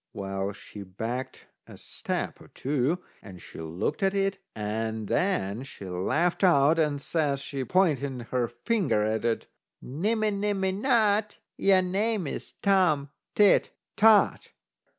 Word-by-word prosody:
Well, 95 Hz, 0 st, -3 dB
she 105 Hz, +1 st, -11 dB
backed 115 Hz, +7 st, -5 dB, 0.2 s
a -, -, -12 dB
step -, -, -5 dB
or -, -, -14 dB
two, 145 Hz, +6 st, -1 dB, 0.2 s
and 95 Hz, -4 st, -11 dB
she -, -, -12 dB
looked 85 Hz, -, -3 dB
at 195 Hz, 0 st, +1 dB
it, 195 Hz, 0 st, 0 dB, 0.2 s
and 110 Hz, 0 st, -3 dB
then 110 Hz, -, 0 dB
she 130 Hz, -7 st, -10 dB
laughed 150 Hz, -, 0 dB
out, 160 Hz, -3 st, +5 dB
and 150 Hz, -3 st, +1 dB
says 145 Hz, -2 st, -1 dB
she, 135 Hz, -1 st, -4 dB
pointing 140 Hz, -7 st, +1 dB
her 125 Hz, -2 st, +1 dB
finger 120 Hz, -, 0 dB
at 110 Hz, 0 st, -1 dB
it: 115 Hz, -1 st, 0 dB, 0.3 s
"Nimmy 215 Hz, -, -1 dB
nimmy 200 Hz, -1 st, 0 dB
not, 210 Hz, -1 st, +1 dB, 0.2 s
Your 190 Hz, -1 st, +4 dB
name's 195 Hz, -2 st, -2 dB
Tom 175 Hz, -8 st, +3 dB, 0.2 s
Tit 205 Hz, -2 st, +4 dB, 0.2 s
Tot." 215 Hz, -1 st, +4 dB
150 Hz, 130 wpm, -27 LUFS, -, 0.3 s, out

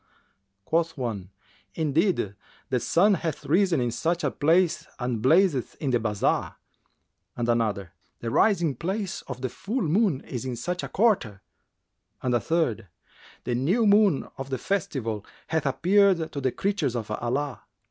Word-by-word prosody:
Quoth 165 Hz, 0 st, 0 dB
one, 110 Hz, -8 st, -4 dB, 0.5 s
"Indeed 160 Hz, -, +1 dB, 0.4 s
the 125 Hz, -, +2 dB
sun 195 Hz, -, +3 dB
hath 165 Hz, -5 st, -3 dB
risen 175 Hz, 0 st, +3 dB
in 120 Hz, -1 st, 0 dB
such 165 Hz, +8 st, -1 dB
a -, -, +1 dB
place 170 Hz, +3 st, +2 dB
and 120 Hz, -3 st, -2 dB
blazeth 155 Hz, -, +3 dB
in 140 Hz, -4 st, -2 dB
the 120 Hz, -, +3 dB
bazar," 105 Hz, -2 st, 0 dB, 0.8 s
and 120 Hz, -1 st, -1 dB
another, 110 Hz, -6 st, 0 dB, 0.3 s
"The 115 Hz, -, -4 dB
rising 170 Hz, -, +3 dB
place 190 Hz, -, -3 dB
of 125 Hz, -2 st, -6 dB
the 130 Hz, -, -1 dB
full 220 Hz, -, -3 dB
moon 175 Hz, -, +2 dB
is 125 Hz, -2 st, -6 dB
in 130 Hz, -2 st, -3 dB
such 180 Hz, +10 st, -3 dB
a -, -, -4 dB
quarter;" 185 Hz, -, +1 dB, 0.8 s
and 125 Hz, -1 st, +1 dB
a 120 Hz, -, +3 dB
third, 155 Hz, -, 0 dB, 0.6 s
"The 125 Hz, -, -2 dB
new 170 Hz, -, +2 dB
moon 205 Hz, -7 st, +4 dB
of 135 Hz, 0 st, -5 dB
the 130 Hz, -, -1 dB
Festival[FN#378] 125 Hz, -, -2 dB, 0.3 s
hath 160 Hz, -2 st, 0 dB
appeared 185 Hz, +3 st, +3 dB
to 140 Hz, -, -4 dB
the 130 Hz, -1 st, +1 dB
creatures 180 Hz, -, -1 dB
of 110 Hz, -3 st, -4 dB
Allah." 130 Hz, +5 st, -2 dB
145 Hz, 155 wpm, -26 LUFS, 120-180 Hz, 0.8 s, moon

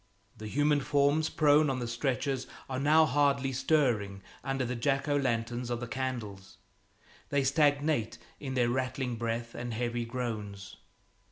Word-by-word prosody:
The 110 Hz, -1 st, -8 dB
human 145 Hz, +5 st, +2 dB
forms 145 Hz, +3 st, +2 dB
prone 150 Hz, 0 st, +4 dB
on 135 Hz, -, -1 dB
the 120 Hz, -2 st, -3 dB
stretchers 130 Hz, +2 st, -1 dB, 0.2 s
are 130 Hz, -1 st, -3 dB
now 155 Hz, +3 st, +5 dB
hardly 140 Hz, -1 st, +2 dB
stirring 125 Hz, -8 st, +1 dB, 0.2 s
under 135 Hz, -1 st, -1 dB
the 125 Hz, +1 st, -3 dB
Jack 135 Hz, +4 st, 0 dB
o' 145 Hz, -, +2 dB
lanterns 120 Hz, -2 st, -1 dB
of 120 Hz, -1 st, -2 dB
the 120 Hz, -, -4 dB
candles; 115 Hz, -6 st, -5 dB, 0.7 s
they 140 Hz, -1 st, +1 dB
stagnate 145 Hz, -3 st, +2 dB, 0.2 s
in 130 Hz, -2 st, -5 dB
their 120 Hz, -2 st, +2 dB
rattling 130 Hz, -1 st, -2 dB
breath 115 Hz, 0 st, -3 dB
and 120 Hz, -1 st, -5 dB
heavy 120 Hz, 0 st, -2 dB
groans. 105 Hz, -5 st, -5 dB
130 Hz, 150 wpm, -30 LUFS, 115-140 Hz, 0.7 s, now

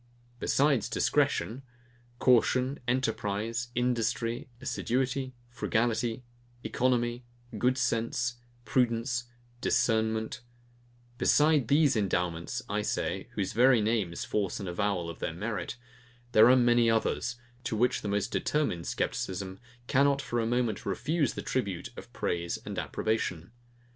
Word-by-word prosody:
Besides 140 Hz, -4 st, +2 dB
DISCRETION, 120 Hz, +5 st, +1 dB, 0.6 s
CAUTION, 130 Hz, +2 st, +3 dB
ENTERPRISE, 115 Hz, -2 st, -1 dB
INDUSTRY, 120 Hz, 0 st, 0 dB
ASSIDUITY, 130 Hz, +1 st, -1 dB, 0.2 s
FRUGALITY, 120 Hz, 0 st, 0 dB, 0.4 s
ECONOMY, 120 Hz, -1 st, 0 dB, 0.4 s
GOOD 125 Hz, +3 st, +2 dB
SENSE, 120 Hz, 0 st, 0 dB, 0.3 s
PRUDENCE, 120 Hz, +1 st, +1 dB, 0.4 s
DISCERNMENT; 110 Hz, -1 st, +1 dB, 0.8 s
besides 150 Hz, -4 st, +4 dB
these 145 Hz, 0 st, +4 dB
endowments, 90 Hz, +2 st, -1 dB
I 105 Hz, +1 st, -1 dB
say, -, -, -2 dB
whose 95 Hz, -, -2 dB
very 125 Hz, +2 st, +5 dB
names 105 Hz, -5 st, 0 dB
force 100 Hz, -4 st, -1 dB
an 100 Hz, -, -5 dB
avowal 90 Hz, -1 st, -1 dB
of 85 Hz, -, -7 dB
their 80 Hz, -, -3 dB
merit, 105 Hz, +1 st, -4 dB, 0.5 s
there 110 Hz, 0 st, +7 dB
are 130 Hz, -, +7 dB
many 120 Hz, -2 st, +4 dB
others, 115 Hz, +2 st, 0 dB, 0.3 s
to 115 Hz, -, -1 dB
which 120 Hz, +3 st, +2 dB
the -, -, -4 dB
most 100 Hz, 0 st, -1 dB
determined 145 Hz, -, 0 dB
scepticism 95 Hz, 0 st, -3 dB, 0.3 s
cannot 140 Hz, +2 st, +3 dB
for 120 Hz, -3 st, -2 dB
a 115 Hz, -, 0 dB
moment 120 Hz, -3 st, 0 dB
refuse 145 Hz, -, 0 dB
the -, -, -5 dB
tribute 100 Hz, -9 st, -2 dB
of -, -, -10 dB
praise 85 Hz, 0 st, -2 dB
and -, -, -4 dB
approbation. 95 Hz, -5 st, -2 dB
115 Hz, 120 wpm, -29 LUFS, 105-125 Hz, 0.8 s, there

